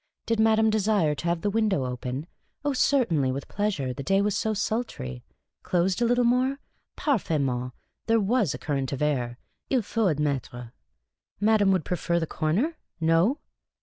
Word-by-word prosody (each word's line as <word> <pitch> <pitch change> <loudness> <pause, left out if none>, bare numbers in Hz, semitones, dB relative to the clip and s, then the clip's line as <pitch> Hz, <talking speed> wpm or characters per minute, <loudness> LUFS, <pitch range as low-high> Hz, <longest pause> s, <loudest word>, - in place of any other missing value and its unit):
Did 230 -1 0
madame 220 0 +4
desire 205 -7 +2
to 145 +2 -7
have 170 -1 0
the 205 - 0
window 210 -10 +1
open? 125 +3 -4 0.4
Oh, 290 - +1
certainly, 205 - +2
with 135 +1 -5
pleasure; 190 -12 -1
the 140 - -6
day 195 +8 +2
was 205 0 +1
so 220 -1 0
sultry. 205 - -3 0.4
Closed 185 +4 0
a - - +4
little 245 +1 +3
more? 255 +3 +2 0.4
Parfaitetnejit, 140 - 0 0.4
that 225 0 +3
was 205 - +1
a - - -5
current 135 -4 -2
of 140 - -2
air, 125 -5 -1 0.3
il 255 -4 +2
faut 205 -6 0
Vadmertre. 130 -5 -3 0.7
Madame 205 -1 +4
would 185 -5 +1
prefer 170 -1 0
the 165 - -1
corner? 190 - -1 0.2
No 165 - +2
185 Hz, 160 wpm, -26 LUFS, 140-220 Hz, 0.7 s, madame